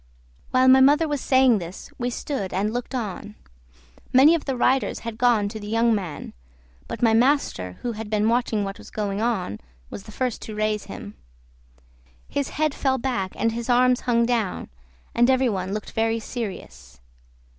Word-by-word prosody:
While 255 0 +3
my 260 0 +7
mother 295 +4 +5
was 290 -3 -2
saying 260 -4 +4
this 175 +1 -9
we 245 0 -1
stood 235 -5 -4
and 205 +4 -1
looked 245 +2 -4
on. 210 -2 -5 0.8
Many 270 +5 +7
of 330 - -1
the 270 -3 -2
riders 260 +2 +1
had 230 -1 -7
gone 235 -4 +3
to 220 +1 -7
the 205 - -8
young 230 +2 +2
man; 185 -8 -4 0.5
but - - -5
my 225 -1 +5
master, 230 - +1
who 240 - -1
had 220 -1 -7
been 215 0 +1
watching 230 -3 +1
what 195 0 -5
was - - -12
going 205 -1 -3
on, 200 - -1 0.3
was - - -6
the 215 - -11
first 250 0 -2
to 215 - -7
raise 215 0 -1
him. 100 - -9 1.1
His 285 -1 -2
head 305 -1 0
fell 265 -2 0
back 235 -7 -2
and 230 - 0
his 235 +2 -5
arms 250 +1 +4
hung 235 -2 +2
down, 230 -5 -1 0.4
and 240 +2 +3
every 260 -1 +3
one 190 -3 -3
looked 210 0 -5
very 225 0 0
serious. 125 - -7
230 Hz, 180 wpm, -24 LUFS, 210-255 Hz, 1.1 s, my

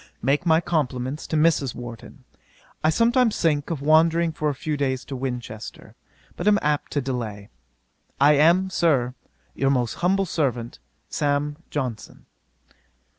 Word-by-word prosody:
'Make 140 +7 0
my 160 0 +5
compliments 140 -4 -2
to - - -2
Mrs. 150 -5 +2
Warton. 120 -2 -10 0.6
I 155 - +4
sometimes 235 +5 +2
think 150 -4 +1
of 155 -5 -3
wandering 165 +2 +4
for 155 -1 -1
a 145 - -3
few 155 +2 -3
days 130 -2 -1
to 140 - -6
Winchester, 125 -4 -6 0.4
but 175 - -4
am 210 -1 +6
apt 150 0 0
to 145 - +1
delay. 115 -6 -5 0.7
I 145 +2 +6
am, 170 +6 +4
Sir, 145 -8 +1 0.4
'Your 135 - 0
most 125 -4 +1
humble 195 +2 +2
servant, 125 -9 -2 0.3
'SAM. 145 0 -1
JOHNSON.' 125 -7 -5
145 Hz, 140 wpm, -24 LUFS, 130-165 Hz, 0.7 s, am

